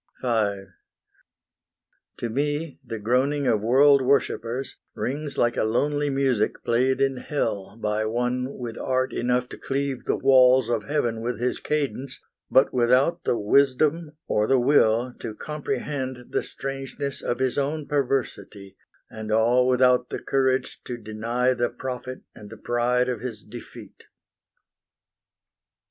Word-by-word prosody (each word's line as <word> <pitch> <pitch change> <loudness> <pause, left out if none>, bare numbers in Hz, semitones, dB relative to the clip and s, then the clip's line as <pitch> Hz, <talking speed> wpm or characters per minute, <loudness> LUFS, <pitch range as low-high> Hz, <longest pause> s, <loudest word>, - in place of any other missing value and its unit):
V 105 -5 0 1.5
To 120 - -3
me 145 +5 -2
the 115 - -6
groaning 130 +7 +1
of 115 -5 +2
world 135 +5 +5
worshippers 130 -1 0 0.2
Rings 145 +3 -4
like 120 0 +2
a - - +2
lonely 145 +6 0
music 135 -5 0
played 130 +3 +1
in 135 -1 +1
hell 110 -9 -3
By 105 0 -1
one 125 +4 -2
with 115 -2 -6
art 130 0 0
enough 125 +1 0
to - - -10
cleave 135 -1 -3
the - - 0
walls 130 -2 +5
Of - - -1
heaven 120 -6 -1
with 120 -1 -3
his 125 +1 -1
cadence, 140 -3 -3 0.3
but 130 - +4
without 125 +6 +2
The 120 - +1
wisdom 145 +7 +2
or 105 0 +1
the 135 - +4
will 120 -2 +3
to 110 - -6
comprehend 135 -3 -4
The - - +1
strangeness 135 0 -5
of 120 - -2
his 130 +1 0
own 145 +2 -2
perversity, 130 -8 -2 0.3
And 110 -1 -7
all 120 +3 +3
without 125 -1 +3
the - - -3
courage 130 -1 0
to 120 - -5
deny 115 +3 -1
The 120 -1 0
profit 130 0 -6
and 105 -1 -12
the 110 - -10
pride 120 +2 +1
of 125 -4 -3
his 120 -4 -6
defeat. 115 -2 -12
125 Hz, 140 wpm, -24 LUFS, 115-135 Hz, 1.5 s, world